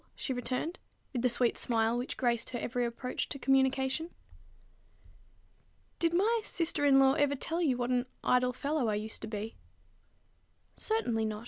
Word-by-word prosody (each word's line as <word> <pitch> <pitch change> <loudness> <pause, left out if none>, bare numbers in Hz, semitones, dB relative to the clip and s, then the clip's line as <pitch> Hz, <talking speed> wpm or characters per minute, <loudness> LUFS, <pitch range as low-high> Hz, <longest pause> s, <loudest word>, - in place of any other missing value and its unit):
she 265 - -3
returned, 255 +7 -3 0.3
with 245 - -1
the 250 - +3
sweet 240 0 +2
smile 225 -1 +1
which 245 +2 -3
graced 235 -2 0
her 245 - -4
every 245 +1 -2
approach 240 +2 -3
to - - -4
communication. 265 +3 +1 1.9
"Did 335 -1 +2
my 435 +7 +2
sister 330 -6 0
in 275 -1 +6
law 270 0 +6
ever 285 -1 +2
tell 330 +5 -2
you 270 -7 +2
what 245 0 -1
an 250 0 +1 0.2
idle 250 0 +3
fellow 280 +1 -1
I 210 - +1
used 215 +1 -4
to 220 - -5
be?" 215 +1 -5 1.2
"Certainly 240 - 0
not. 215 -1 -3
255 Hz, 160 wpm, -31 LUFS, 235-285 Hz, 1.9 s, in